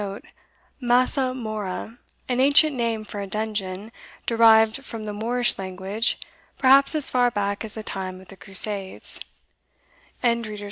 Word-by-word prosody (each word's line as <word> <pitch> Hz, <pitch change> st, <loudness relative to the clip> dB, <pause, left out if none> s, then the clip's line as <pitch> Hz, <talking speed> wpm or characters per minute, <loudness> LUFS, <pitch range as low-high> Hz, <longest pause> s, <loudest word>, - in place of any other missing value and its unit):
* -, -, -37 dB
Massa 255 Hz, +2 st, +2 dB
mora, 215 Hz, -3 st, -5 dB, 0.3 s
an 250 Hz, -1 st, 0 dB
ancient 285 Hz, +2 st, +5 dB
name 230 Hz, -3 st, -1 dB
for 205 Hz, -1 st, -6 dB
a 200 Hz, -, -5 dB
dungeon, 210 Hz, -1 st, -4 dB, 0.3 s
derived 225 Hz, +2 st, +5 dB
from 225 Hz, -4 st, -6 dB
the 210 Hz, -, -4 dB
Moorish 240 Hz, +3 st, 0 dB
language, 190 Hz, +4 st, -2 dB, 0.4 s
perhaps 275 Hz, +3 st, +5 dB
as 300 Hz, -3 st, +1 dB
far 245 Hz, -1 st, +3 dB
back 205 Hz, -2 st, -2 dB
as 220 Hz, -1 st, -8 dB
the 220 Hz, -, -6 dB
time 185 Hz, -2 st, -5 dB
of 190 Hz, -, -16 dB
the 195 Hz, -, -11 dB
Crusades. 195 Hz, 0 st, -2 dB
220 Hz, 135 wpm, -24 LUFS, 200-245 Hz, 0.4 s, ancient